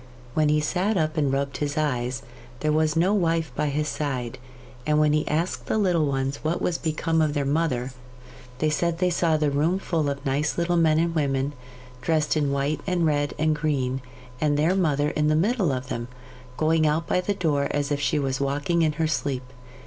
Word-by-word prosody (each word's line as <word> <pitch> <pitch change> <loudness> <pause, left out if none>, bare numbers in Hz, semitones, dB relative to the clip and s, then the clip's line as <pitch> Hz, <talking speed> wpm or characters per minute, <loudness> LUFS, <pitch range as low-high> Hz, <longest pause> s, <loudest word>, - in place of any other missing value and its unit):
When 155 0 +2
he 150 0 +3
sat 185 +7 0
up 155 -2 0
and 145 -4 +1
rubbed 140 0 -1
his 145 0 -2
eyes, 130 -4 -1 0.4
there 155 - +1
was 155 0 +2
no 180 +5 +3
wife 165 -6 +1
by 150 - 0
his 150 +1 -1
side, 130 -5 -3 0.4
and 150 +2 +1
when 150 -1 +3
he 155 - +1
asked 150 -6 -1
the - - +1
little 175 -7 +2
ones 135 0 -1
what 160 +2 0
was 175 - -1
become 160 0 0
of 155 -1 +1
their 145 -1 0
mother, 135 -4 0 0.7
they 155 +3 +1
said 170 +2 0
they 180 0 +1
saw 165 -2 +2
the 150 -1 +1
room 155 +6 +1
full 165 -6 -1
of 140 0 -5
nice 140 +3 0
little 175 0 +1
men 160 -2 +4
and 165 +1 +1
women, 140 -2 0 0.5
dressed 155 +1 +1
in 145 -2 +1
white 140 +2 -1
and 180 -3 +1
red 145 -2 0
and 155 0 +2
green, 135 -4 -1 0.4
and 150 -1 +2
their 160 +5 +3
mother 150 -6 +1
in 150 0 0
the 155 - +3
middle 195 - +2
of 130 -1 -4
them, 120 0 -3 0.5
going 155 0 +3
out 155 +2 +1
by 180 - +1
the 200 +2 -1
door 150 -6 +1
as 145 0 -1
if 145 - 0
she 145 +2 +1
was 135 -2 -1
walking 145 +5 0
in 155 -2 +2
her 160 +1 0
sleep. 140 -4 -1
150 Hz, 210 wpm, -25 LUFS, 140-165 Hz, 0.7 s, men